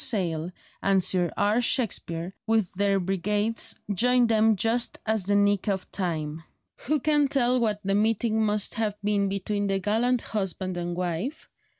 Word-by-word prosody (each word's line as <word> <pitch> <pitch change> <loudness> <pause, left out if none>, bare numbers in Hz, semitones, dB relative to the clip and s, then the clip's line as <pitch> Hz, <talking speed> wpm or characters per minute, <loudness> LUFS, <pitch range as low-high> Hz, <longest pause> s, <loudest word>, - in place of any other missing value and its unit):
Sale 175 -8 -1 0.3
and 195 -1 +2
Sir 180 -1 +2
R. 210 +4 +2
Shakespear 185 -8 0
with 220 -5 +1
their 200 +1 +1
brigades 205 +4 0
joined 245 +3 +3
them 220 -1 +4
just 230 +4 0
at 220 -3 0
the 205 - +2
nick 205 0 +2
of 195 -2 -2
time. 160 -4 -3 0.5
Who 305 +2 +2
can 295 0 +2
tell 255 -2 +2
what 210 -3 0
the 195 0 0
meeting 220 +1 +1
must 210 -1 +1
have 215 -2 -1
been 200 -1 +1
between 200 +1 -2
the 195 0 +1
gallant 225 +5 +1
husband 190 -3 -3
and 175 0 -4
wife? 180 - -4
205 Hz, 160 wpm, -26 LUFS, 185-225 Hz, 0.5 s, them